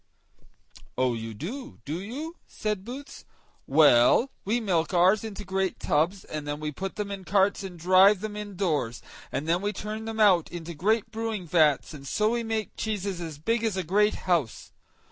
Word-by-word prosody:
"Oh! 130 -1 +2
you 115 -1 -5
do, 235 - -7
do 155 +4 -3
you?" 295 - -6
said 210 -3 -3
Boots. 265 +6 -9 0.4
"Well, 145 - +5
we 225 +5 +1
milk 180 -5 0
ours 185 +5 +4
into 215 -2 -6
great 190 -1 -1
tubs, 170 +6 +1
and 150 -1 -6
then 145 0 -3
we 155 0 -3
put 190 +6 -5
them 205 -1 -4
in 195 -1 -5
carts 195 +2 +2
and 185 -2 -7
drive 185 +4 +6
them 215 -1 -5
indoors, 180 - -2 0.3
and 150 - -3
then 170 +2 +2
we 205 +1 0
turn 215 +2 -5
them 225 0 -5
out 190 -6 +4
into 170 -1 -6
great 215 +7 0
brewing 220 -4 -3
vats, 155 -3 +3
and 140 -2 -10
so 215 +9 +1
we 240 0 0
make 225 -2 -3
cheeses 200 -4 -3
as 160 -3 -6
big 230 +9 0
as 220 -4 0
a 190 - 0
great 210 +5 +2
house. 165 -11 0
190 Hz, 185 wpm, -27 LUFS, 160-215 Hz, 0.4 s, drive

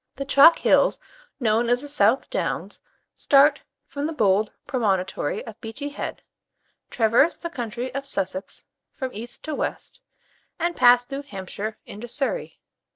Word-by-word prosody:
The 275 - -5
chalk 285 +4 +7
hills - - +3 0.4
known 230 -1 +1
as 245 +2 +2
the - - -6
South 290 +1 +2
Downs - - -3 0.3
start 285 0 +4 0.2
from 285 +1 -4
the 325 - -4
bold 210 -5 +2
promontory 195 - -1
of 225 -1 -11
Beachy 230 +6 -6
Head, 285 - -6 0.7
traverse 235 +8 +3
the 340 - -6
county 240 -2 -5
of 275 +1 -4
Sussex 190 -4 -3 0.3
from 260 -4 -5
east 235 +4 -7
to 310 - -4
west, - - -5 0.6
and 340 +1 -1
pass 245 -1 +6
through 275 +2 -5
Hampshire 215 -3 -6
into 215 +4 -9
Surrey. 285 - -3
245 Hz, 145 wpm, -24 LUFS, 220-285 Hz, 0.7 s, chalk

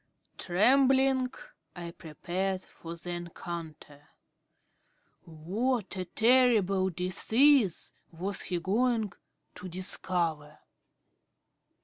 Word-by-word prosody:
Trembling, 260 +6 +3 0.4
I 170 -1 -6
prepared 180 +4 -3
for 165 0 -10
the 175 +1 -7
encounter. 165 -4 -8 1.2
What 195 +8 -2 0.2
terrible 220 -6 +4
disease 205 - +2 0.2
was 185 +4 -4
he 175 -2 -2
going 220 +3 0 0.4
to 185 0 -8
discover? 165 -4 -2
185 Hz, 70 wpm, -29 LUFS, 170-235 Hz, 1.2 s, terrible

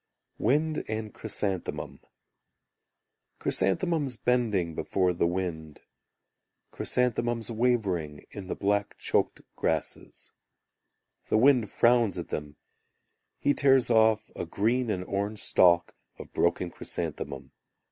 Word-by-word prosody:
Wind 150 +6 +1
and 110 0 -4
Chrysanthemum 100 -4 -3 1.4
Chrysanthemums 145 - +1
bending 110 -10 +1
Before 90 +3 0
the 85 - +1
wind. 85 -4 -4 0.9
Chrysanthemums 120 -2 0
wavering 100 -11 0
In 100 -3 -8
the - - -3
black 100 0 -1
choked - - 0
grasses. - - -3 1.0
The - - +3
wind 125 -3 +4
frowns 115 -4 +3
at - - -5
them, 75 -1 -5 0.8
He 145 - +2
tears 135 -4 +4
off 110 -1 +3
a - - -4
green 120 +4 0
and 90 -3 -1
orange 100 +3 -3
stalk 85 -1 +4 0.2
of - - -11
broken 85 +1 +1
chrysanthemum. 75 -5 -5
105 Hz, 105 wpm, -28 LUFS, 90-120 Hz, 1.4 s, wind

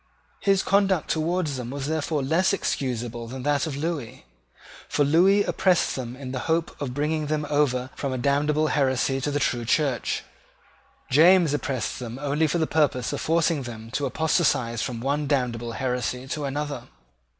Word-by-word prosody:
His 195 -1 +2
conduct 195 -4 +2
towards 160 -2 0
them 120 -2 -5
was 140 +1 -4
therefore 155 -1 -1
less 180 +8 +2
excusable 120 - -2
than 130 +2 -7
that 145 +1 +1
of 140 -3 -4
Lewis: 150 -6 -4 0.7
for 145 - +2
Lewis 190 +7 +4
oppressed 185 -3 +2
them 125 -2 -5
in 130 -1 -7
the 130 - -3
hope 165 +1 0
of 130 -3 -3
bringing 150 +1 -1
them 150 0 -1
over 130 -3 +1
from 140 - -3
a 130 - -2
damnable 150 +4 +1
heresy 135 -1 +1
to 145 - -1
the 145 - -1
true 120 -4 0
Church: 135 +1 0 0.9
James 165 +2 +6
oppressed 135 -5 -2
them 120 -1 -6
only 145 +3 +1
for 155 - 0
the 160 - +1
purpose 145 -6 +1
of - - -3
forcing 165 -2 +1
them 115 -2 -8
to 140 +2 -1
apostatize 135 -6 +1
from 120 -3 -3
one 145 +3 -1
damnable 120 -4 -1
heresy 125 0 -2
to 150 0 -3
another. 145 +1 -3
145 Hz, 170 wpm, -25 LUFS, 125-155 Hz, 0.9 s, James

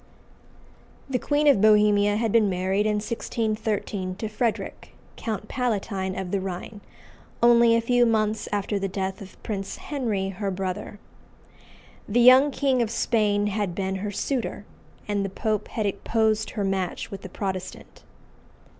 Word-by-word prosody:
The 260 -2 -1
Queen 290 +3 +1
of 280 -9 +5
Bohemia 210 -1 +5
had 225 0 0
been 220 -2 +4
married 190 +3 0
in 210 - +1
1613 215 -3 -2
to 220 - -4
Frederic, 220 +1 -3 0.2
Count 215 -2 -4
Palatine 200 -7 -2
of 190 -2 -4
the 200 - +1
Rhine, 190 +3 -6 0.6
only 235 -1 +6
a 230 - +2
few 245 +1 +3
months 215 -1 0
after 205 0 -1
the 195 - -1
death 190 0 -4
of 190 -1 -11
Prince 195 -3 -4
Henry 220 -10 -2
her 195 +1 -3
brother. 190 +2 -4 1.1
The 230 +4 +2
young 255 +4 +8
King 270 -3 +1
of 230 - 0
Spain 210 -3 +1
had 205 -3 -2
been 190 0 -2
her 205 +2 -3
suitor, 225 0 -3 0.4
and 205 -1 0
the 195 - -2
Pope 215 +2 -2
had 215 - -3
opposed 215 +2 0
her 205 - 0
match 190 +1 -2
with 195 -1 -7
a 190 - -7
Protestant. 185 -1 -6
210 Hz, 150 wpm, -25 LUFS, 195-230 Hz, 1.1 s, young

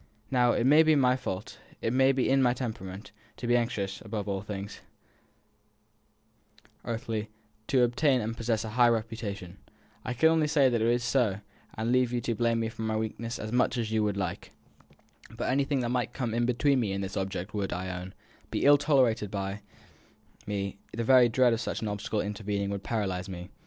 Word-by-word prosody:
Now, 125 -2 +4
it - - +1
may 150 +4 +7
be 155 -1 +4
my 130 -3 +4
fault, 105 -6 -5 0.2
it 115 - -1
may 130 +1 +5
be 130 -1 0
in 135 0 +3
my 125 -1 +3
temperament, 105 -6 -6 0.3
to - - -6
be 120 0 +3
anxious, 105 -5 -1
above 105 -2 -5
all 100 -1 -2
things 100 0 -7 2.0
earthly, 110 -2 -3 0.4
to 130 -2 +3
obtain 130 +2 +2
and 115 0 -3
possess 115 -1 -1
a 110 - -5
high 120 +2 +4
reputation. 110 -5 -3 0.4
I 125 - -3
can 160 +6 +5
only 160 -2 +2
say 145 -3 +4
that 120 -2 0
it 115 - +2
is 120 +1 +2
so, 115 -6 +1 0.3
and 110 +2 -1
leave 125 -1 +3
you 125 - 0
to 115 - -1
blame 115 +1 +1
me 110 - -1
for 110 - -9
my 110 0 -1
weakness 115 +1 -4
as 110 +1 -6
much 125 +1 +2
as 115 -2 -2
you 105 -2 +2
like. 95 -4 -4 0.8
But - - -3
anything 140 0 +1
that 120 - -1
might 125 0 -1
come 120 -5 -3
in 120 +1 +1
between 130 +2 +2
me 105 -5 -1
and 100 0 -2
this 95 +1 -5
object 95 +1 -3
would, 100 -2 -2
I 90 +1 -3
own, 90 +1 -8 0.3
be - - -1
ill 145 0 +7
tolerated 130 -8 +2
by 100 +1 -4 0.9
me; 100 -1 -3
the 115 - -2
very 125 0 +6
dread 125 +1 +4
of 115 - -1
such 110 - -3
an - - -1
obstacle 105 +1 -2
intervening 100 -1 -3
would 100 -1 -3
paralyse 95 -4 -2
me. 90 -1 -8
115 Hz, 200 wpm, -29 LUFS, 100-125 Hz, 2.0 s, may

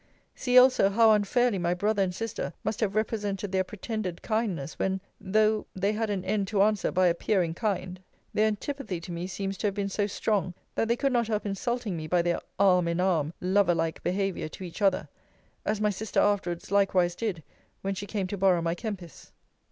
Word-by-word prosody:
See, 250 0 +2
also, 250 -6 +7
how 220 +2 +5
unfairly 215 +1 +2
my 175 0 +1
brother 205 +2 +1
and 180 -2 0
sister 225 +1 -4
must 220 - -2
have 210 -3 0
represented 205 -3 -1
their 190 -1 +2
pretended 205 -2 -5
kindness, 200 -10 -2
when 190 0 0 0.2
(though 215 +2 +2
the 195 +2 +1
had 220 0 -1
an 195 -3 -2
end 200 -2 0
to 200 -1 +3
answer 210 -1 +1
by 185 0 +3
appearing 175 0 +1
kind) 185 -2 -2 0.3
their 215 +1 +3
antipathy 215 -2 -3
to 170 +1 -8
me 170 +1 -4
seems 195 0 -4
to 210 - +1
have 200 - -2
been 200 -1 -1
so 205 +1 0
strong, 190 -3 -1 0.2
that 225 - 0
they 235 - +2
could 275 +1 0
not 235 -2 +2
help 215 -1 -1
insulting 210 +1 -2
me 155 -1 -5
by 175 +1 +2
their 175 0 0 0.2
arm 180 -3 +4
in 170 +1 -1
arm 170 -5 +1
lover 185 -1 +3
like 165 -1 -2
behaviour 195 -3 -1
to 170 - -9
each 175 +3 -8
other; 195 -2 +2 0.6
as 215 - +1
my 210 0 +2
sister 210 +1 -2
afterwards 185 -4 0
likewise 190 -3 +3
did, 185 -6 -3 0.4
when 195 0 -1
she 200 +1 -6
came 200 -3 -2
to 200 +2 -4
borrow 185 -2 +4
my 165 0 +1
Kempis. 185 - -7
195 Hz, 200 wpm, -28 LUFS, 180-215 Hz, 0.6 s, also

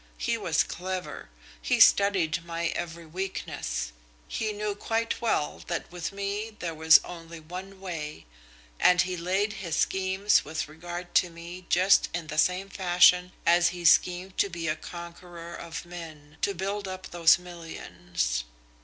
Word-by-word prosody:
He - - 0
was - - +1
clever. 185 0 -5 0.3
He - - +1
studied 185 -5 +5
my 170 0 -2
every 170 -1 -5
weakness. 155 - -4 0.4
He 220 -1 -2
knew 210 0 -2
quite 225 +2 -2
well 225 -10 0
that 170 -1 -3
with 175 -2 -4
me 200 +2 -4
there 170 -2 -4
was 160 0 +7
only 165 -1 -9
one 185 +4 -9
way, 160 - -6 0.5
and 180 -1 +5
he 180 0 -3
laid 190 +5 0
his 170 -4 -2
schemes 190 +3 +2
with 160 +1 -4
regard 175 +3 -8
to 180 - -8
me 170 +2 -10
just 190 +2 +4
in 175 -2 -3
the 155 0 -2
same 180 +4 +2
fashion 180 -1 +4
as 175 +1 +5
he 175 0 -7
schemed 180 +3 +3
to 200 - +3
be 170 -2 -4
a 155 - +1
conqueror 170 0 -9
of 170 0 -7
men, 160 -4 -10
to 200 - 0
build 195 +2 -3
up 185 0 -7
those 170 -1 +6
millions. 90 - -4
175 Hz, 155 wpm, -28 LUFS, 165-190 Hz, 0.5 s, was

